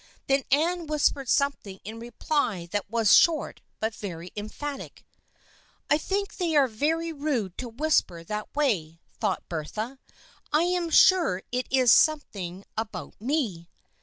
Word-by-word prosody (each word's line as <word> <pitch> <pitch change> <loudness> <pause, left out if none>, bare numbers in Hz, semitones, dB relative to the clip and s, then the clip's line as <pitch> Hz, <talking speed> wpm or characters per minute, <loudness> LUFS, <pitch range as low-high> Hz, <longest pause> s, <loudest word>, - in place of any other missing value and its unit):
Then 275 0 +1
Anne 335 +4 +1
whispered 290 -3 +1
something 245 -9 0
in 220 +3 -7
reply 235 - -2
that 205 -1 -2
was 225 -2 +3
short 330 -2 +3 0.2
but 220 +1 -1
very 175 -5 -7
emphatic. 270 +7 -6 0.4
" - - -33
I 295 - +5
think 400 +5 -2
they 340 -4 0
are 280 -2 +5
very 320 +8 -1
rude 270 - -2
to 250 - -4
whisper 230 - 0
that 210 +7 -5
way," 180 - 0 0.2
thought 205 -4 -1
Bertha. 215 - -5 0.3
" - - -29
1 305 +2 +4
am 355 -1 0
sure 330 - +5
it 250 +1 -2
is 255 -3 +4
some 310 +4 +5
thing 185 -5 -8
about 205 -8 -5
me." 225 - -2
250 Hz, 150 wpm, -26 LUFS, 200-305 Hz, 0.4 s, I